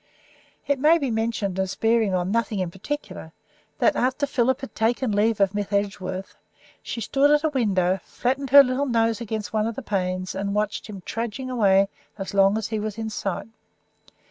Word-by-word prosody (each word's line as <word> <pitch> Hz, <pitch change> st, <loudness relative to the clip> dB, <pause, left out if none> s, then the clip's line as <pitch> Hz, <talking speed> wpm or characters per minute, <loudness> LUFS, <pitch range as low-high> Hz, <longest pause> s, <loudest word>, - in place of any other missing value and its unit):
It 285 Hz, -2 st, 0 dB
may 310 Hz, +4 st, +5 dB
be 275 Hz, -6 st, -2 dB
mentioned 220 Hz, -4 st, -1 dB
as 190 Hz, 0 st, -1 dB
bearing 225 Hz, -2 st, +2 dB
on 180 Hz, +1 st, -1 dB
nothing 230 Hz, -1 st, 0 dB
in 185 Hz, -3 st, -2 dB
particular 190 Hz, -, -6 dB, 0.4 s
that, -, -, +3 dB
after 260 Hz, +3 st, +1 dB
Philip 260 Hz, -1 st, +1 dB
had 270 Hz, -, -7 dB
taken 235 Hz, +2 st, 0 dB
leave 210 Hz, +1 st, +2 dB
of 195 Hz, -1 st, +3 dB
Miss 205 Hz, -1 st, -3 dB
Edgeworth, 195 Hz, -2 st, -2 dB, 0.5 s
she -, -, -5 dB
stood 275 Hz, +6 st, +2 dB
at 295 Hz, +1 st, +4 dB
a 315 Hz, -, +2 dB
window, 195 Hz, -9 st, +1 dB
flattened 265 Hz, +2 st, -2 dB
her 280 Hz, +2 st, +10 dB
little 265 Hz, +2 st, -1 dB
nose 230 Hz, -2 st, +1 dB
against 220 Hz, -2 st, -4 dB
one 215 Hz, 0 st, +1 dB
of 230 Hz, -, -4 dB
the 270 Hz, -, -6 dB
panes, 185 Hz, -3 st, -2 dB
and 200 Hz, +1 st, -3 dB
watched 210 Hz, 0 st, -1 dB
him 200 Hz, -3 st, -8 dB
trudging 235 Hz, +3 st, -4 dB
away 200 Hz, -5 st, +4 dB, 0.3 s
as 195 Hz, -1 st, -6 dB
long 195 Hz, +1 st, +4 dB
as 220 Hz, -1 st, -3 dB
he 220 Hz, -1 st, -2 dB
was 215 Hz, 0 st, -4 dB
in 220 Hz, -1 st, -4 dB
sight. 200 Hz, +1 st, -4 dB
220 Hz, 190 wpm, -24 LUFS, 195-250 Hz, 0.5 s, her